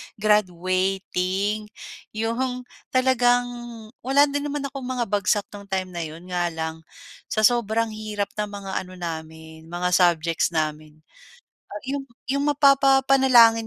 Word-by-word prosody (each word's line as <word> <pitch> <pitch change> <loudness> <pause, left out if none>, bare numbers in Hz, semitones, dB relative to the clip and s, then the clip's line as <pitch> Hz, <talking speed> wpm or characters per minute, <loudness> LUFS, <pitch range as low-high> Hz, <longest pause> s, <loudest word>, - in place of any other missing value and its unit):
graduating. 190 +1 0 0.5
'Yong 250 +3 -2 0.3
talagang 245 -1 +4 0.6
wala 270 +3 +4
din 285 +1 -2
naman 290 -1 -3
akong 270 -3 -6
mga 255 -2 -1
bagsak 205 0 +1
nung 200 -1 -10
time 190 -1 -2
na 175 - -5
'yon, 160 +2 -11
nga 175 -1 +1
lang 160 0 -4 0.5
sa 215 - -1
sobrang 230 -1 +2
hirap 210 -2 -4
ng 210 - 0
mga 200 -1 -7 0.2
ano 185 - -12
namin 160 -2 -7
mga 175 +1 -2
subjects 170 -2 +3
namin. 155 0 -3 0.9
'Yong 275 -1 -3 0.2
'yong 280 +1 0
mapapapanalangin 270 -4 +5
210 Hz, 125 wpm, -24 LUFS, 175-250 Hz, 0.9 s, mapapapanalangin